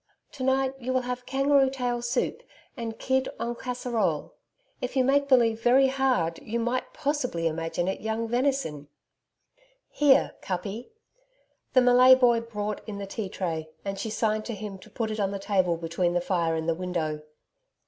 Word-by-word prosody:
To 265 - -7
night, 265 0 +2
you 255 +1 -2
will 255 - +2
have 250 0 -5
kangaroo 275 0 +3
tail 245 -2 -2
soup, 240 +1 -1 0.3
and 230 -3 -5
kid 260 0 0
EN 235 +1 -2
CASSEROLE. 235 -9 -2 0.5
If 250 - -4
you 260 - +4
make 280 +2 +3
believe 230 -4 +4
very 260 +3 +5
hard 255 -12 0
you 230 +2 -3
might 240 +2 -1
possible 290 - -2
imagine 165 +2 -1
it 190 - -2
young 220 +1 -2
venison.... 240 - -1 1.0
Here, 290 -2 +4
Kuppi!' 195 +5 -4 0.8
The 255 - +6
Malay 250 +1 +7
boy 240 -3 +4
brought 210 -2 -4
in 205 - -5
the 200 - -5
tea 195 0 -5
tray 165 -5 -3 0.2
and 195 0 -3
she 220 - -3
signed 215 0 0
to 235 - -4
him 200 -1 -7
to - - -15
put 225 -2 -3
it 215 - -4
on 200 -2 +1
the 200 - -3
table 190 -4 +1
between 170 +1 -1
the - - +3
fire 170 -3 0
and 160 0 -3
the 165 - +3
window. 160 -3 -3
230 Hz, 175 wpm, -27 LUFS, 185-255 Hz, 1.0 s, Malay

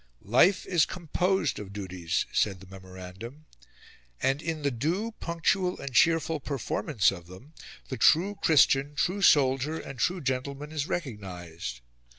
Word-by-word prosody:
"Life 155 - +4
is 175 -4 +2
composed 180 +2 -1
of 100 -2 -8
duties," 95 -4 -2
said 100 -3 +1
the 95 - -13
memorandum, 95 +8 -10 0.7
"and 135 +2 0
in 160 -3 -4
the 140 - +1
due, 170 - -1
punctual 180 +2 0
and 140 -2 -6
cheerful 165 +3 +3
performance 135 - 0
of 90 -3 -9
them 95 - -14 0.4
the 130 - -4
true 185 +6 +4
Christian, 145 -2 +4
true 185 +6 0
soldier, 140 -1 +3
and 135 -3 -9
true 180 +7 +1
gentleman 140 +1 -3
is 150 -1 -3
recognised... 90 - -6
140 Hz, 140 wpm, -28 LUFS, 100-165 Hz, 0.7 s, Life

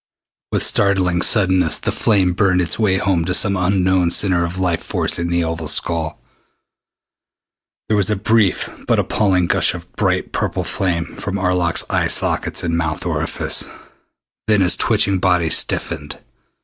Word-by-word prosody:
With - - +1
startling 95 -3 +1
suddenness 95 -7 +2
the - - -3
flame 95 -5 +1
burned 90 -1 +1
its 90 +3 -1
way 100 -4 +2
home 95 -3 0
to 90 +1 0
some 100 -1 +2
unknown 95 -1 +1
center 90 0 +3
of 85 +2 -4
life 90 -3 -1
force - - -2
in 85 - -2
the 85 0 0
oval 80 -1 -4
skull. 80 0 0 1.7
There 110 - +1
was 100 -2 +1
a 105 - +1
brief 105 0 +1 0.2
but - - +2
appalling 95 -4 +1
gush 85 - +2
of - - -12
bright - - -1
purple - - -2
flame 85 -3 -2
from 100 +2 -6
Arlok's 90 -3 +1
eye - - 0
sockets - - 0
and 85 -1 -1
mouth 80 -2 -3
orifice. - - -1 0.8
Then 105 -2 +3
his 90 -1 +3
twitching 100 -4 +2
body 90 -3 +1
stiffened. 75 +1 -1
90 Hz, 155 wpm, -18 LUFS, 85-100 Hz, 1.7 s, center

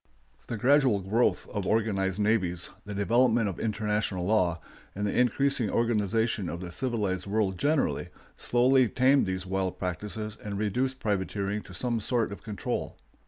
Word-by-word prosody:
] - - -35
The 115 - -3
gradual 130 -2 +4
growth 110 +6 +1
of 100 -3 -3
organized 100 -3 +1
navies, 95 -5 0
the 105 -1 -6
development 115 +2 +3
of 95 - -4
international 105 -4 -1
law, 90 -5 +2 0.4
and 100 +1 -2
the 100 - -1
increasing 125 -1 +2
organization 110 -3 +1
of 85 - -5
the 90 -1 -7
civilized 100 -5 -2
world 100 -3 0
generally, 145 0 +1 0.3
slowly 125 0 +3
tamed 130 +2 +3
these 95 0 -2
wild 95 -1 -2
practices 105 +4 -4
and 100 -1 -4
reduced 125 +6 -1
privateering 100 0 -1
to 90 - -11
some 120 +4 0
sort 115 0 0
of 100 - -8
control. 105 -4 -4
105 Hz, 155 wpm, -28 LUFS, 95-120 Hz, 0.4 s, gradual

